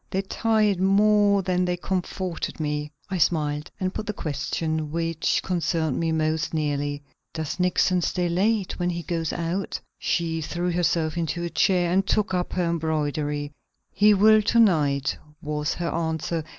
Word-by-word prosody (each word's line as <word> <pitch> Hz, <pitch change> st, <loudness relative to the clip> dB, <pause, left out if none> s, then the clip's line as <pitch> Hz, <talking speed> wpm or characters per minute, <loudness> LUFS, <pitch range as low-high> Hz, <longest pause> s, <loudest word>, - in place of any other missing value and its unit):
They 190 Hz, +1 st, -1 dB
tired 215 Hz, -1 st, +1 dB
more 200 Hz, +1 st, +4 dB
than 180 Hz, -1 st, +1 dB
they 180 Hz, 0 st, -1 dB
comforted 185 Hz, -1 st, -3 dB
me." 150 Hz, -1 st, -2 dB, 0.2 s
I 185 Hz, -, -1 dB
smiled, 150 Hz, -2 st, +1 dB
and 185 Hz, 0 st, -1 dB
put 215 Hz, -, -5 dB
the 210 Hz, -, -1 dB
question 155 Hz, 0 st, -3 dB
which 165 Hz, -1 st, 0 dB
concerned 165 Hz, -5 st, 0 dB
me 165 Hz, -1 st, 0 dB
most 160 Hz, 0 st, 0 dB
nearly. 145 Hz, -1 st, -1 dB, 0.3 s
"Does 160 Hz, +1 st, -4 dB
Nixon 180 Hz, 0 st, +2 dB
stay 180 Hz, +1 st, 0 dB
late 195 Hz, +3 st, 0 dB
when 175 Hz, 0 st, 0 dB
he 170 Hz, -1 st, -3 dB
goes 165 Hz, -3 st, -2 dB
out?" 175 Hz, +3 st, -3 dB, 0.2 s
She 165 Hz, -2 st, -1 dB
threw 175 Hz, +3 st, -2 dB
herself 170 Hz, -1 st, 0 dB
into 170 Hz, +1 st, -2 dB
a 170 Hz, -, -3 dB
chair 180 Hz, -3 st, +2 dB
and 190 Hz, +2 st, +3 dB
took 205 Hz, +1 st, 0 dB
up 180 Hz, -1 st, -1 dB
her 180 Hz, -1 st, 0 dB
embroidery. 150 Hz, -3 st, -1 dB, 0.4 s
"He 210 Hz, 0 st, +5 dB
will 215 Hz, +2 st, +6 dB
to 225 Hz, +3 st, +2 dB
night," 145 Hz, -9 st, +3 dB, 0.2 s
was 150 Hz, 0 st, -2 dB
her 170 Hz, -1 st, -2 dB
answer. 160 Hz, 0 st, -2 dB
170 Hz, 160 wpm, -25 LUFS, 155-185 Hz, 0.4 s, will